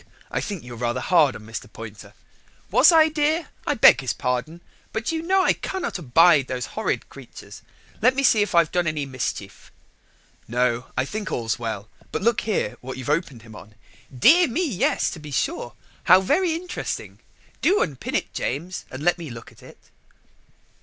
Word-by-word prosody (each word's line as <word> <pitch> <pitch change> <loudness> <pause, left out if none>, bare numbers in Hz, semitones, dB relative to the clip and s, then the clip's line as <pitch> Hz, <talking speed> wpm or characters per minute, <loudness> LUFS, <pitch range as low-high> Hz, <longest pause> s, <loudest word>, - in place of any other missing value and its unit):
I - - -1
think 200 -6 -5
you're 125 -1 -9
rather 120 0 -1
hard 155 -8 +3
on 110 - -10
Mr. 115 -1 -8
Poynter." 110 -2 -11 0.6
"Was - - +7
I, 325 -1 +7
my 315 - +1
dear? 310 +2 0 0.2
I 290 - +1
beg 220 - +7
his 125 -4 -2
pardon, 125 +9 -3 0.3
but 220 +5 -2
you 320 -1 -2
know 380 +3 +2
I - - +4
cannot 380 - -4
abide 155 -1 +4
those 125 -1 -3
horrid - - -2
creatures. - - -12 0.4
Let 250 +4 +4
me 275 - 0
see 225 -5 +5
if 205 -3 -1
I've 170 -2 +4
done 175 -2 0
any 150 -2 -1
mischief." 125 -6 -6 0.8
"No, 125 0 0
I 130 - +1
think 210 +6 -5
all's 115 -2 -2
well: 110 -3 -4 0.2
but - - -3
look 235 +1 +2
here 210 - -2
what 130 +1 -7
you've 130 +1 -6
opened 150 -8 -2
him 110 -2 -13
on." 105 +1 -13 0.4
"Dear 315 - +5
me, 290 +9 -1
yes, 205 -10 0
to 165 - -8
be 150 -1 -10
sure! 120 -3 -2 0.3
how 185 +1 +7
very 330 - +1
interesting. 355 +2 -5 0.4
Do 395 +4 +3
unpin 140 -6 -5
it, - - -2
James, 165 +9 -4
and 130 +3 -8
let 175 +1 +2
me 165 -3 -7
look 115 -1 -10
at - - -20
it." - - -15
155 Hz, 185 wpm, -23 LUFS, -, 0.8 s, Was